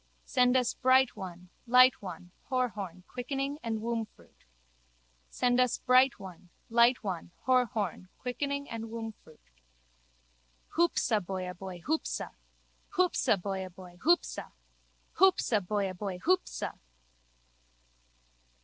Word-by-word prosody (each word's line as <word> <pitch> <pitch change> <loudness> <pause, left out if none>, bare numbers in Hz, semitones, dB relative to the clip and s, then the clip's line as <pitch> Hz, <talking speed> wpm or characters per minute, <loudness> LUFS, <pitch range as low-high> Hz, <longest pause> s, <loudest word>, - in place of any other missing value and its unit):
Send 250 -1 +3
us 250 -2 +1
bright 260 0 +4
one, 180 -3 -8 0.2
light 255 +1 +6
one, 180 -2 -8 0.2
Horhorn, 205 -9 -2
quickening 275 +3 -3
and 225 -2 -3
wombfruit. 230 -2 -5 0.8
Send 245 0 +1
us 250 -2 +3
bright 255 -1 +4
one, 185 -2 -11 0.2
light 235 +1 +4
one, 180 -5 -4 0.2
Horhorn, 230 -8 +1
quickening 280 +3 -3
and 225 -1 -5
wombfruit. 220 - -9 1.2
Hoopsa 320 -10 +2
boyaboy 180 -1 -6
hoopsa! 315 +2 -2 0.6
Hoopsa 355 - +3
boyaboy 185 -2 -6
hoopsa! 345 - +1 0.7
Hoopsa 365 - +4
boyaboy 195 -2 -2
hoopsa! 370 +1 0
230 Hz, 95 wpm, -30 LUFS, 190-255 Hz, 1.2 s, light